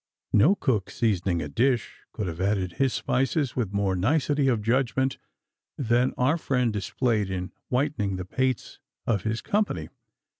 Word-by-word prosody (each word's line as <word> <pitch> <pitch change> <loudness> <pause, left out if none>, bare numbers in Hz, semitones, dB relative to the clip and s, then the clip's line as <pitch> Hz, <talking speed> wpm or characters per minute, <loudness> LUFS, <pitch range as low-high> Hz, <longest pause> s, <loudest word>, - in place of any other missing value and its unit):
No 150 - +6
cook 115 - 0
seasoning 95 -6 0
a - - -4
dish 125 -1 0
could 105 - -3
have 85 0 -4
added 95 -2 0
his 130 +9 +1
spices 135 +3 0
with 115 -7 -1
more 100 -2 +1
nicety 145 - +2
of 115 -5 +1
judgment 130 +3 +1 0.6
than 120 0 +2
our 140 +7 +2
friend 125 -6 +1
displayed 105 +1 0
in 90 -1 -3 0.2
whitening 125 -7 0
the 90 -1 -5
pates 130 +4 -2 0.3
of 105 -5 +1
his 110 +1 -2
company. 210 +1 -1
120 Hz, 150 wpm, -26 LUFS, 100-130 Hz, 0.6 s, No